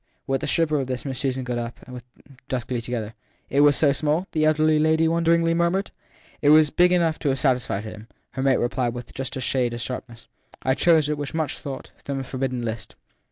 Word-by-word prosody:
With 135 Hz, -1 st, -1 dB
the -, -, -3 dB
shiver 155 Hz, -3 st, +1 dB
of 135 Hz, -, -3 dB
this 130 Hz, +1 st, -4 dB
Miss 130 Hz, -2 st, -3 dB
Susan 130 Hz, -1 st, -1 dB
got 125 Hz, -1 st, -3 dB
up, 120 Hz, 0 st, -5 dB
and 125 Hz, -, -10 dB
they -, -, -6 dB
stood 120 Hz, 0 st, -24 dB, 0.2 s
there 130 Hz, -, -1 dB
duskily 120 Hz, 0 st, -4 dB
together. 115 Hz, -2 st, -4 dB, 0.4 s
e 135 Hz, -, -2 dB
It -, -, +6 dB
was 145 Hz, -1 st, +6 dB
so 145 Hz, -3 st, +4 dB
small? 155 Hz, +5 st, 0 dB
the 155 Hz, -1 st, +1 dB
elder 155 Hz, 0 st, +3 dB
lady 155 Hz, +1 st, +3 dB
won 165 Hz, +1 st, +1 dB
deringly 165 Hz, 0 st, +3 dB
murmured. 170 Hz, +3 st, 0 dB, 0.5 s
It 145 Hz, -, +4 dB
was 155 Hz, -1 st, +6 dB
big 180 Hz, 0 st, +4 dB
enough 170 Hz, -3 st, +2 dB
to 145 Hz, -, 0 dB
have 135 Hz, 0 st, 0 dB
satisfied 125 Hz, -7 st, 0 dB
him, 110 Hz, 0 st, -9 dB, 0.2 s
her 130 Hz, -, -4 dB
mate 135 Hz, -1 st, +3 dB
replied 120 Hz, -1 st, -1 dB
with 120 Hz, 0 st, -8 dB
just 130 Hz, -1 st, -5 dB
a -, -, -4 dB
shade 125 Hz, -1 st, 0 dB
of 120 Hz, -, -5 dB
sharpness. 120 Hz, -1 st, -7 dB, 0.4 s
I 130 Hz, -, +2 dB
chose 160 Hz, 0 st, +3 dB
it, 150 Hz, -1 st, -2 dB
with 145 Hz, +1 st, -5 dB
much 160 Hz, -2 st, -2 dB
thought, 135 Hz, -2 st, -7 dB
from 140 Hz, -1 st, -3 dB
the 135 Hz, -, -3 dB
forbidden 130 Hz, -2 st, -3 dB
list. 110 Hz, -2 st, -5 dB
135 Hz, 240 wpm, -24 LUFS, 125-155 Hz, 0.5 s, It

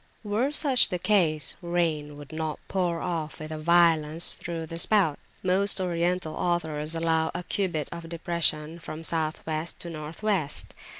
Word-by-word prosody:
Were 220 Hz, +7 st, 0 dB
such 280 Hz, -4 st, +5 dB
the 180 Hz, -, -1 dB
case, 165 Hz, -7 st, +2 dB
rain 165 Hz, -4 st, -1 dB
would 145 Hz, -2 st, -11 dB
not 155 Hz, -1 st, -2 dB
pour 175 Hz, -3 st, 0 dB
off 165 Hz, -3 st, -3 dB
with 155 Hz, 0 st, -7 dB
violence 160 Hz, 0 st, +3 dB
through 165 Hz, -1 st, -5 dB
the 165 Hz, +1 st, -6 dB
spout. 185 Hz, -7 st, +3 dB, 0.2 s
Most 190 Hz, +2 st, +4 dB
Oriental 175 Hz, -2 st, 0 dB
authors 160 Hz, -3 st, -1 dB
allow 160 Hz, -1 st, +1 dB
a 180 Hz, -, -3 dB
cubit 175 Hz, -7 st, -1 dB
of 170 Hz, -1 st, -7 dB
depression 165 Hz, -1 st, 0 dB
from 160 Hz, -1 st, -7 dB
South 160 Hz, -1 st, -1 dB
West 160 Hz, +1 st, -3 dB
to 170 Hz, -, -4 dB
North 155 Hz, +4 st, -7 dB
West. 190 Hz, -9 st, 0 dB
165 Hz, 155 wpm, -27 LUFS, 155-180 Hz, 0.2 s, such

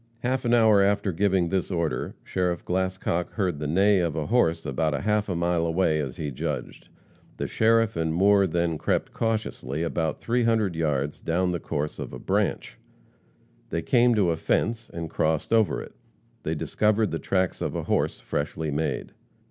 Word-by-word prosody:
Half 130 Hz, +1 st, -1 dB
an 120 Hz, -, +2 dB
hour 110 Hz, -3 st, +5 dB
after 100 Hz, 0 st, +2 dB
giving 95 Hz, -1 st, +1 dB
this 95 Hz, -1 st, -1 dB
order, 85 Hz, -4 st, -2 dB
Sheriff 90 Hz, -2 st, -2 dB
Glascock 95 Hz, -1 st, -1 dB
heard 90 Hz, -8 st, -1 dB
the 75 Hz, -, -3 dB
neigh 95 Hz, +5 st, +4 dB
of 85 Hz, -4 st, 0 dB
a 80 Hz, -2 st, -2 dB
horse 85 Hz, -8 st, +1 dB
about 75 Hz, +2 st, 0 dB
half 105 Hz, 0 st, 0 dB
a 90 Hz, -, -1 dB
mile 85 Hz, 0 st, +1 dB
away, 80 Hz, -1 st, +1 dB
as 65 Hz, -4 st, -4 dB
he 75 Hz, -2 st, -3 dB
judged. 60 Hz, -, -5 dB, 0.5 s
The -, -, -2 dB
sheriff 115 Hz, 0 st, +2 dB
and 80 Hz, -1 st, 0 dB
Moore 100 Hz, +3 st, +4 dB
then 85 Hz, -2 st, -1 dB
crept -, -, -1 dB
cautiously 105 Hz, -, -2 dB
about 80 Hz, -2 st, -1 dB
three 120 Hz, +1 st, 0 dB
hundred 110 Hz, -6 st, +1 dB
yards 75 Hz, -3 st, -1 dB
down 90 Hz, +2 st, 0 dB
the 85 Hz, -, -2 dB
course 75 Hz, 0 st, -3 dB
of -, -, -6 dB
a -, -, -5 dB
branch. -, -, -1 dB, 0.9 s
They 85 Hz, -, -2 dB
came 120 Hz, -1 st, +4 dB
to 95 Hz, -5 st, +3 dB
a 80 Hz, -, -1 dB
fence, 115 Hz, +7 st, -1 dB
and 85 Hz, -1 st, -5 dB
crossed 80 Hz, +5 st, 0 dB
over 110 Hz, -3 st, +2 dB
it. -, -, -13 dB, 0.5 s
They 80 Hz, -, -2 dB
discovered 105 Hz, +6 st, +1 dB
the 80 Hz, -, -2 dB
tracks 95 Hz, -2 st, -1 dB
of -, -, -2 dB
a -, -, -2 dB
horse, -, -, 0 dB
freshly 75 Hz, +1 st, -3 dB
made. 80 Hz, +2 st, -2 dB
90 Hz, 180 wpm, -26 LUFS, 80-105 Hz, 0.9 s, hour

